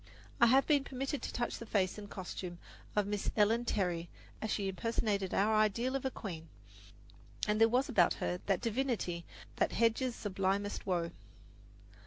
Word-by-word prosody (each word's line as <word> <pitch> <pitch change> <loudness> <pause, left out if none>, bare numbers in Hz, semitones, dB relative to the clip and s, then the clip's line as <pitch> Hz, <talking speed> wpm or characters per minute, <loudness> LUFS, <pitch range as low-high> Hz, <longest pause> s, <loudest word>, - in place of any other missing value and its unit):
I 235 - +7
have 265 +4 +5
been 290 -3 +3
permitted 270 +1 -3
to - - -4
touch 240 - -2
the 230 - -7
face 195 -1 +1
and 205 -1 -9
costume 180 -2 -6 0.4
of 210 -1 +3
Miss 205 0 -1
Ellen 225 +3 +3
Terry 175 -6 -1 0.3
as 220 - -2
she 200 -1 0
impersonated 200 -1 -1
our 210 +3 +3
ideal 215 +5 +2
of 270 - -2
a - - +2
queen; 165 -9 -7 1.0
and 210 +1 +1
there 225 - +7
was 255 +4 +2
about 195 -10 +4
her 180 - -2
that 195 -3 +2
divinity 230 -8 -1 0.3
that - - +1
hedges 230 +2 +2
sublimest 200 0 -1
woe. 170 -2 0
210 Hz, 165 wpm, -34 LUFS, 190-235 Hz, 1.0 s, I